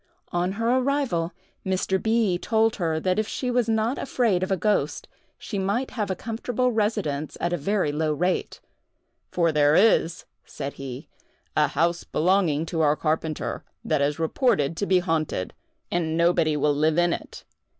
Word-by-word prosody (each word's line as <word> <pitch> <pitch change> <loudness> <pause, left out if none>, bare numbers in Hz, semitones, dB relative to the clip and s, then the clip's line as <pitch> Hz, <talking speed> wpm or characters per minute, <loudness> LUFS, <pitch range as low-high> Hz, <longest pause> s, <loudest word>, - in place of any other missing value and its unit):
On 175 +2 0
her 230 +4 +1
arrival 255 -12 0 0.3
Mr. 190 0 0
B. 220 -5 +1
told 225 +1 +1
her 165 -4 0
that 185 +5 0
if 215 - 0
she 250 +2 -2
was 240 -2 +1
not 225 +3 +1
afraid 230 -9 +1
of 185 - -1
a 190 - +1
ghost, 210 +2 0 0.3
she 205 - -5
might 205 +7 -1
have 215 -5 -3
a 190 - -1
comfortable 245 +3 -1
residence 205 -10 -1
at 175 - -1
a - - +3
very 185 0 0
low 155 +1 0
rate, 180 +5 -1 0.7
"For 170 -2 +1
there 150 0 +4
is," 185 -5 +3 0.2
said 140 - -6
he, 135 +2 -7 0.5
"a 150 -1 +4
house 170 +4 0
belonging 165 -3 +1
to 165 -1 -2
our 150 -1 +4
carpenter, 155 0 -2 0.2
that 155 -2 +1
is 145 +1 +1
reported 165 - +1
to 200 - -1
be 185 - +4
haunted, 160 - -1 0.4
and 165 -2 0
nobody 170 -3 +3
will 145 +1 +2
live 155 +2 +1
in 175 0 +3
it. - - -7
175 Hz, 170 wpm, -25 LUFS, 155-215 Hz, 0.7 s, there